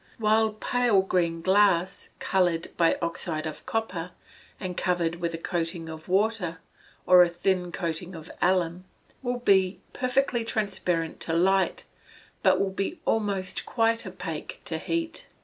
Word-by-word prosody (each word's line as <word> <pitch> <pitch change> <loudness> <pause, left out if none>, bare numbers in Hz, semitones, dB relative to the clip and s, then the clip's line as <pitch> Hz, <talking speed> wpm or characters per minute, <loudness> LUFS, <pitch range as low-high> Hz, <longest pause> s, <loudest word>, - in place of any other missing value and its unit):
While 220 0 +3
pale 230 -2 +2
green 170 -3 0
glass, 190 -2 +3
coloured 175 -3 0
by 170 -1 +3
oxide 165 -1 -2
of 155 - -6
copper, 185 -6 -2 0.5
and 185 -2 -4
covered 175 -2 0
with 170 -1 -2
a - - -4
coating 165 -1 -3
of 160 0 -9
water, 190 -3 +1 0.5
or 180 0 +8
a 175 - +5
thin 180 +1 0
coating 170 +1 -4
of 160 +1 -9
alum, 180 0 +1 0.4
will 245 -1 -1
be 195 -5 +3
perfectly 255 -1 +1
transparent 190 -7 -1
to 165 - -2
light, 190 +3 +2 0.6
but - - +4
will 195 - +1
be 195 - -3
almost 200 -4 0
quite 230 -1 +1
opaque - - -6
to - - -2
heat. 330 -1 -3
185 Hz, 140 wpm, -27 LUFS, 170-215 Hz, 0.6 s, or